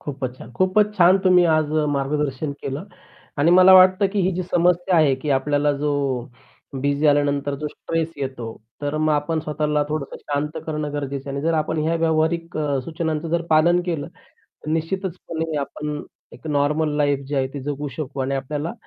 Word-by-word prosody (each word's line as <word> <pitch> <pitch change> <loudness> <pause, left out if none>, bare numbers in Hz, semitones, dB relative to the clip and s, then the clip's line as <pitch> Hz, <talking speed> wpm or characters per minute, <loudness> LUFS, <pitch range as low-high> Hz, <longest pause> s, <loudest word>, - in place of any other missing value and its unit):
खूपच 130 -3 -5
छान, - - -11
खूपच 205 - +2
छान! 185 +2 +6
तुम्ही 180 -1 +6
आज 155 -1 0
अ, 155 -1 +1
मार्गदर्शन 140 0 -2
केलं. 140 +6 -4 0.5
आणि 160 +4 +4
मला 185 +1 +7
वाटतं 185 +2 +6
की 205 - +1
ही 185 - +2
जी 185 - -2
समस्या 175 +1 +2
आहे 150 -4 +4
की 150 - -2
आपल्याला 145 +2 +2
जो 145 +1 -1 0.9
बिझी 140 +1 0
झाल्यानंतर 145 -1 +2
जो 150 +2 -5
स्ट्रेस 165 +1 -3
येतो, 130 -4 -5 0.4
तर 145 +1 -2
मग 155 0 +2
आपण 150 +2 0
स्वतःला 150 -1 0
थोडंसं 150 -2 -4
शांत 145 +1 -3
करणं 150 -2 -3
गरजेचं 140 -1 -4
आहे 140 - -4
आणि 140 - -3
जर 165 - +2
आपण 155 0 -1
ह्या 165 +2 +1
व्यावहारिक 165 +1 0
अ, 145 -3 0
सूचनांचं 165 +1 -2
पालन 170 +3 +4
केलं, 165 -3 -2 0.4
तर 155 - -11
निश्चितचपणे 165 -2 -3
आपण 150 +1 -4 0.3
एक - - -11
नॉर्मल 150 +1 +1
लाईफ 145 -2 +2
जी 145 - -3
आहे 135 -1 +1
ती 140 - -4
जगू 145 0 -3
शकू 145 -3 -5
आणि 135 +1 -1
आपल्याला 145 - -3
150 Hz, 180 wpm, -22 LUFS, 145-165 Hz, 0.9 s, मला